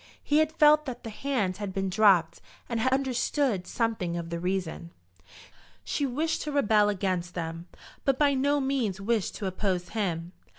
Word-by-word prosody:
He 295 +1 +3
had 310 0 +2
felt 305 -1 +5
that 255 - -6
the 225 - -6
hand 215 -7 -1
had 205 -2 -4
been 195 0 -1
dropped, 190 -4 +3 0.3
and 235 -2 -2
had 255 +3 +1
understood 260 -5 0
something 215 -7 -1
of 170 -1 -6
the 170 - -3
reason. 180 -2 -3 0.9
She 285 - -1
wished 310 +6 -1
to 300 - -4
rebel 215 -7 +3
against 185 -3 -2
them, 165 0 -5 0.4
but 275 -2 +2
by 285 -1 +3
no 285 +2 +2
means 260 -8 -1
wished 215 0 -1
to 205 - -5
oppose 185 -1 -2
him. 175 -6 -2
210 Hz, 170 wpm, -28 LUFS, 180-270 Hz, 0.9 s, felt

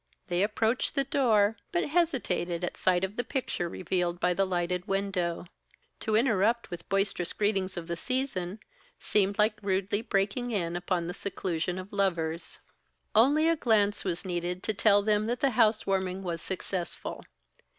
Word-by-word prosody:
They 175 0 +1
approached 220 +6 +1
the 275 - +3
door, 225 -6 +3
but 175 - +1
hesitated 245 - 0
at 175 - -2
sight 180 -1 +2
of 190 +3 -3
the 245 - 0
picture 245 -11 -2
revealed 175 0 -1
by 180 0 +2
the 195 +2 +1
lighted 180 0 -1
window. 195 -4 -1 0.5
To 220 -2 0
interrupt 230 -1 +2
with 175 - -4
the - - -22
boisterous 195 -3 0
greetings 195 -3 0
of 170 - -4
the 170 0 -3
season, 215 -4 -2 0.4
seemed 200 0 +1
like 215 0 +2
rudely 195 +1 0
breaking 210 +3 0
in 175 -7 -1
upon 175 0 -1
the 175 - -4
seclusion 180 -2 -3
of 185 +2 -8
lovers. 170 -5 -1 0.6
Only 285 +8 +5
a 330 - +4
glance 210 -7 +2
was 180 -1 -2
needed 180 0 -3
to 220 - 0
tell 205 0 +4
them 210 0 +2
that 240 +1 -1
the 275 - +2
house 215 -1 +3
warming 190 -1 -1
was 170 -3 -3
successful. 185 -2 -4
195 Hz, 165 wpm, -29 LUFS, 180-220 Hz, 0.6 s, Only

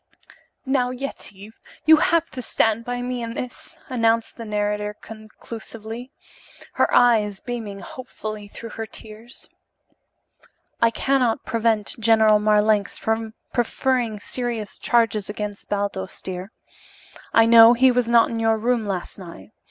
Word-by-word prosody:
"Now, 260 -2 +1
Yetive, 220 -5 -6 0.3
you 315 +1 +8
have 335 0 +2
to 255 - -5
stand 225 -1 +1
by 245 +1 -4
me 250 0 -3
in 230 0 -5
this," 250 -1 -7
announced 230 -4 +1
the 230 - -8
narrator 210 0 -2
conclusively, 225 +2 -9 0.6
her - - +2
eyes 215 -5 +3
beaming 220 -5 -6
hopefully 215 -5 -8
through 230 +2 -10
her 225 -1 -6
tears. 220 +3 -11 1.3
"I 230 - +5
cannot 250 -1 0
prevent 225 -2 0
General 220 -1 +5
Marlanx 210 -1 +2
from 220 0 -2 0.2
preferring 240 -2 0
serious 235 -2 -5
charges 225 -4 +1
against 205 -1 -6
Baldos, 200 -2 -3
dear. 185 +2 -6 0.8
I 225 - +5
know 230 0 +8
he 255 +2 +5
was 245 -1 +1
not 235 -1 +4
in 230 - -3
your 225 0 +2
room 230 -1 0
last 190 0 -4
night. 170 - -11
225 Hz, 130 wpm, -22 LUFS, 210-240 Hz, 1.3 s, you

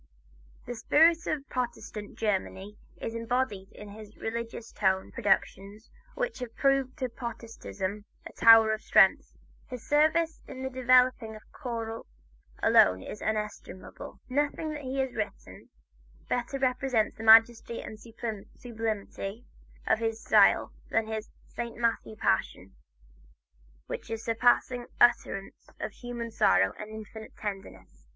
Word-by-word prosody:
The 245 - -5
spirit 320 +8 +3
of 285 -3 -2
Protestant 235 -4 -5
Germany 200 -1 -2 0.2
is 225 - -4
embodied 230 -4 -2
in 210 - -11
his 215 +1 -12
religious 230 0 -5
tone 190 -2 0
productions 200 0 -1 0.2
which - - -3
have 245 -2 -7
proved 275 -1 +1
to 260 -4 -2
Protestantism 225 -4 -6 0.2
a - - -9
tower 225 -1 +7
of 215 - -4
strength. - - +4 0.4
His 250 -3 -9
service 315 +2 +2
in 260 - -8
developing 255 -2 +3
the 215 - -9
choral 230 -2 -5 0.6
alone 95 0 +5
is 210 - -8
inestimable. 210 -3 -5
Nothing 295 +4 -1
that 300 -1 -6
he 265 0 -4
has 265 -2 -3
written, 215 -2 -6 0.6
better 245 +3 -2
represents 255 -3 0
the 220 - -9
majesty 225 +1 +5
and 215 - -9
sublimity 220 -1 -6 0.4
of - - +2
his 225 -1 -2
style - - +4 0.2
than 225 0 +1
his 220 0 -5 0.2
"Saint 235 0 -6
Matthew 230 -2 -1
Passion" 95 - -1 1.1
with - - -6
its 225 0 -4
surpassing 245 +1 +2
utterances 240 -4 +1
of - - -4
human 240 -1 -6
sorrow 95 - +3
and 215 - -7
infinite 220 0 -10
tenderness. 95 - -8
225 Hz, 125 wpm, -28 LUFS, 210-250 Hz, 1.1 s, tower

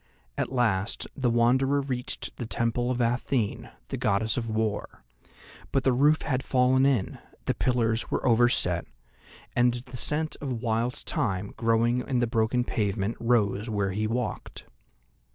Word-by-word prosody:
At - - -2
last 115 -5 0
the 130 -3 +1
Wanderer 130 +4 +3
reached 130 -3 -4
the 120 - -5
Temple 115 +2 -1
of 125 -1 -1
Athene, 120 -1 0 0.2
the - - -3
Goddess 105 +2 +1
of 115 -2 -3
War; 110 -1 -2 0.7
but 135 - +1
the 130 - +3
roof 150 +5 +3
had 130 -2 0
fallen 130 +1 +3
in, 125 -9 0 0.3
the - - +1
pillars 115 -3 0
were - - -1
overset, 115 -8 +3 0.7
and 120 0 +3
the 125 +1 -8
scent 155 +4 -1
of 130 -4 -4
wild 115 +2 0
thyme 105 - -2
growing 115 +2 +2
in 130 - 0
the 120 - +3
broken 115 +1 +1
pavement 105 -2 -1
rose 115 -2 +1
where 100 -3 0
he 105 +3 -1
walked. 120 +3 -4
120 Hz, 150 wpm, -27 LUFS, 110-125 Hz, 0.7 s, Wanderer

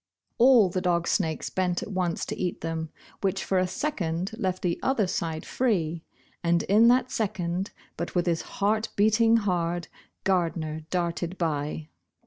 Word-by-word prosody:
All 240 -4 +7
the 185 +1 -2
dog 170 -2 +1
snakes 160 -5 0
bent 180 -1 0
at - - -7
once 180 -3 -1
to - - -4
eat 180 -2 -3
them, 160 -1 -3 0.3
which 195 -1 0
for 190 - +2
a 185 - +1
second 185 - -2
left 185 -4 -1
the 170 -2 0
other 260 -6 +2
side 165 -3 -3
free, 170 -10 0 0.4
and 170 0 +2
in 215 +4 +5
that 255 +1 +4
second, 185 -3 -1 0.3
but 170 +3 -4
with 175 - +2
his 170 -2 +1
heart 215 +2 0
beating 220 +2 +4
hard, 175 -4 -1 0.3
Gardner 160 -4 -1
darted 175 0 -2
by. 150 -1 -2
180 Hz, 155 wpm, -27 LUFS, 170-200 Hz, 0.4 s, All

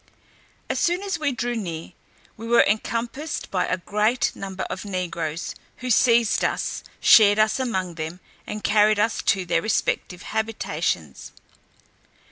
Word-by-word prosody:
As - - -1
soon 350 +3 +1
as 395 -1 -2
we 295 -2 0
drew 245 -1 -2
near, 170 -7 -5 0.4
we 225 +1 -8
were 235 0 +6
encompassed 235 +8 -2
by 185 -2 0
a 185 - 0
great 210 +6 0
number 190 -1 -5
of - - -5
negroes, 175 -5 -3 0.2
who 255 0 -3
seized 235 -1 +4
us, - - -1 0.2
shared 205 -2 +7
us 215 +3 +2
among 190 -9 -2
them, 160 +2 -6 0.3
and 210 0 -5
carried 215 0 +4
us 220 +2 +1
to 190 -4 +1
their - - +1
respective 185 -4 -1
habitations. 165 - -3
215 Hz, 140 wpm, -24 LUFS, 180-235 Hz, 0.4 s, shared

